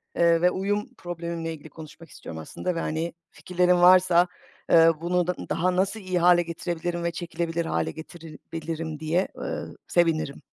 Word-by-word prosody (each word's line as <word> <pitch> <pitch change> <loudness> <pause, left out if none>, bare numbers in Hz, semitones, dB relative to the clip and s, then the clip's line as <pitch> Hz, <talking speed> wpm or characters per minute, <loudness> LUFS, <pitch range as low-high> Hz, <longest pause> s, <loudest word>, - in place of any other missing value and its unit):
eee, 170 -1 +4
ve 180 0 +4
uyum 205 +5 -1
problemimle 170 -1 -5
ilgili 155 0 -11
konuşmak 160 +2 -12
istiyorum 80 - -9
aslında 180 - -4
ve, 165 - -2
hani, 160 +2 -2 0.2
fikirlerin 180 0 +1
varsa, 180 -1 +6 0.4
eee, 165 0 +7
bunu 175 0 +1
d 180 - +1 0.2
daha 180 +2 +1
nasıl 195 +4 0
iyi 185 -2 -1
hâle 175 0 +6
getirebilirim 170 +1 -4
ve 170 - 0
çekilebilir 170 -1 -3
hâle 80 - -1
getirebilirim 160 -1 -7
diye, 165 +4 0
eee, - - -4 0.2
sevinirim 165 -5 +1
170 Hz, 155 wpm, -25 LUFS, 165-180 Hz, 0.4 s, eee